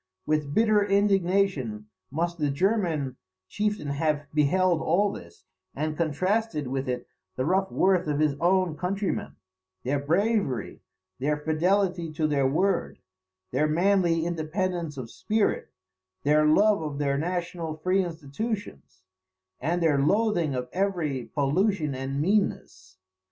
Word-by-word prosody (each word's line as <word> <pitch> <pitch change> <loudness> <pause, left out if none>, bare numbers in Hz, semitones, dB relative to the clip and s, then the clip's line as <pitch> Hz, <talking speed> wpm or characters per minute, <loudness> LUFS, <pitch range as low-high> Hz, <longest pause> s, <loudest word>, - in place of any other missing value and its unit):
With 150 -2 -1
bitter 215 -2 +4
indignation 195 - +1 0.2
must 170 +4 -2
the 150 -1 +1
German 160 - 0 0.3
chieftain 210 - -2
have 150 +1 0
beheld 170 +3 +2
all 190 +6 +2
this, 85 - -12 0.3
and 155 +2 -2
contrasted 170 +2 0
with 130 +1 -2
it 125 - -3 0.3
the 130 - -1
rough 190 +3 +1
worth 185 -3 +2
of 150 -1 0
his 155 -2 +3
own 180 -1 +2
countrymen; 190 +3 -2 0.5
their 140 +3 0
bravery, 170 - 0 0.4
their 150 +3 0
fidelity 175 +3 +1
to 155 +1 0
their 140 -3 +2
word, 180 +6 0 0.5
their 145 +4 +2
manly 170 0 +2
independence 170 -1 -2
of 120 -3 -6
spirit 215 -1 0 0.5
their 150 +1 +4
love 200 +5 +4
of 150 -3 -4
their 140 -1 0
national 170 -1 -3
free 185 +5 +1
institutions, 170 - -6 0.6
and 170 +5 -1
their 150 -4 +3
loathing 175 -3 +2
of 125 0 -3
every 175 -9 -1
pollution 155 +2 0
and 135 +1 -3
meanness. 155 - -1
165 Hz, 125 wpm, -26 LUFS, 145-190 Hz, 0.6 s, bitter